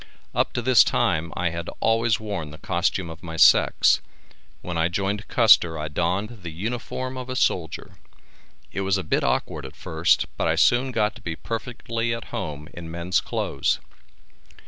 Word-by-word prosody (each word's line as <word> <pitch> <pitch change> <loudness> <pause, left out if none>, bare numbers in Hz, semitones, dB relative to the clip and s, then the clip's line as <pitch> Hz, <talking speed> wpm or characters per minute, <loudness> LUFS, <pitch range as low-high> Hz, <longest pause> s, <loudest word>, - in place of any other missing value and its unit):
Up - - +1
to 120 - -2
this 125 -2 +7
time 80 +1 0
I 85 -2 0
had 85 0 -5
always 115 0 +2
worn 100 -8 -4
the 75 - -11
costume 85 +1 -1
of 80 +1 -11
my 80 -2 -7
sex. - - +5 0.6
When 90 - -4
I 80 0 +2
joined 100 +4 -2
Custer 90 -8 +5
I 75 0 -4
donned 105 +9 -2
the 85 - -6
uniform 120 +8 -4
of 130 0 -6
a 130 - -3
soldier. 85 - -1 0.7
It 100 - -3
was 95 0 +1
a 95 - -3
bit - - 0
awkward - - -1
at - - -9
first - - +1
but - - 0
I - - +2
soon 125 +2 +3
got 110 -2 +1
to - - -16
be 85 -5 -4
perfectly 115 +2 -3
at 115 - -9
home 75 0 -4
in 85 -1 -8
men's 85 +2 0
clothes. - - -1
95 Hz, 175 wpm, -24 LUFS, 85-115 Hz, 0.7 s, this